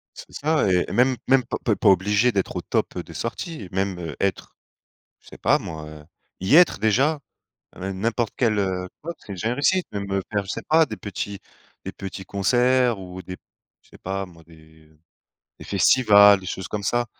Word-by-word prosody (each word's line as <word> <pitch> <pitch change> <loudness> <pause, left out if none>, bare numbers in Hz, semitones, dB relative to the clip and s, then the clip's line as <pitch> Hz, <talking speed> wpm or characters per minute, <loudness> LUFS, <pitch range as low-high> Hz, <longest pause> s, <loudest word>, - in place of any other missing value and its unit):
C'est - - -12
ça 150 -9 +1
et 90 -1 +3
même 130 +1 +3
même 130 0 +4
pas 120 - -4
pas 110 - +2
pas 105 - +2
obligé 105 +5 +3
d'être 95 -2 -2
au - - -1
top - - -2
des - - -8
sorties. 115 - -5
Même 90 -4 -3
être, 100 -1 -2 0.7
je - - -19
sais - - -12
pas - - +3
moi, 80 -1 -7
heu, 75 -1 -11 0.4
y 95 +11 +3
être 175 0 +6
déjà, 130 +9 +2 0.6
même 95 0 -5
n'importe 115 +1 -1
quel, 110 -4 +1
heu, 95 -2 -1 0.2
ouais, 170 - -3
c'est 100 - -10
déjà 110 +5 -3
une 120 - 0
réussite, 180 +7 +1
même, 100 -1 -5
heu, 95 - 0
faire, 100 -1 0
je 95 - -7
sais - - -4
pas, 160 0 +5
des 110 - -7
petits 100 0 -5 0.5
des - - -5
petits 95 0 -8
concerts 120 +4 +2
ou 95 -1 -9
des 90 +1 -8 0.5
je - - -27
sais - - -16
pas 95 +1 -4
moi, 85 -2 -17
des 80 -1 -20 0.7
des - - -9
festivals, 100 -5 +5
des 95 - -11
choses 95 0 -5
comme 105 +2 -4
ça, 120 +3 0
100 Hz, 200 wpm, -23 LUFS, 95-120 Hz, 0.7 s, être